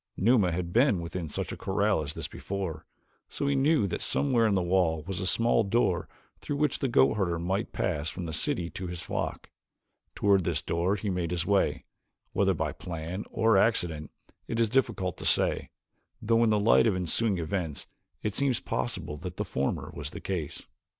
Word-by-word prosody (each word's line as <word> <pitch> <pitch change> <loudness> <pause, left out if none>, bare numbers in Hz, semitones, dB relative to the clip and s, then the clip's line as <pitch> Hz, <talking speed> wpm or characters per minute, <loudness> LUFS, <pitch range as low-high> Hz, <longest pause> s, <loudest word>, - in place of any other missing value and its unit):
Numa 105 -3 +4
had 85 +1 -3
been 120 -4 +4
within 85 0 -4
such - - -3
a - - -4
corral 100 -1 +1
as 75 0 -4
this - - -4
before, 95 -6 -5 0.4
so - - -4
that 140 - +2
he - - +2
knew 140 -2 +3
that 95 - -3
somewhere 125 -5 +2
in 105 - +2
the 95 - +2
wall 85 -3 +2
was 95 +2 -4
a 95 - -2
small 115 +4 +3
door 100 -4 +1 0.3
through 145 - -3
which 150 -1 +1
the 135 - 0
goatherd 95 -7 +3
might 95 +4 -1
pass 75 +6 -1
from 90 -1 -6
the 80 - -5
city 85 +3 0
to 95 - -5
his 85 -1 -6
flock; - - -4 0.6
toward 100 -2 +3
this - - -1
door 85 +4 0
he 105 0 -2
made 90 -2 -1
his 85 -1 -1
way, 100 +1 +1 0.5
whether - - +2
by - - -1
plan 85 +3 -5
or 110 -2 +3
accident 85 -8 +1 0.4
it 115 - -2
is 115 -2 +2
difficult 115 -9 0
to - - -8
say, - - +2 0.5
though 115 +1 +3
in 115 - +4
the 105 -1 +3
light 115 +2 +5
of 105 - +2
ensuing 95 +3 +1
events 80 -2 -3 0.4
it 105 - -1
seems 135 -2 +1
possible 65 +4 -3
that 90 +3 -7
the - - -1
former 65 +1 -2
was - - -5
the - - -8
case. 85 -6 -4
95 Hz, 195 wpm, -28 LUFS, 85-110 Hz, 0.6 s, light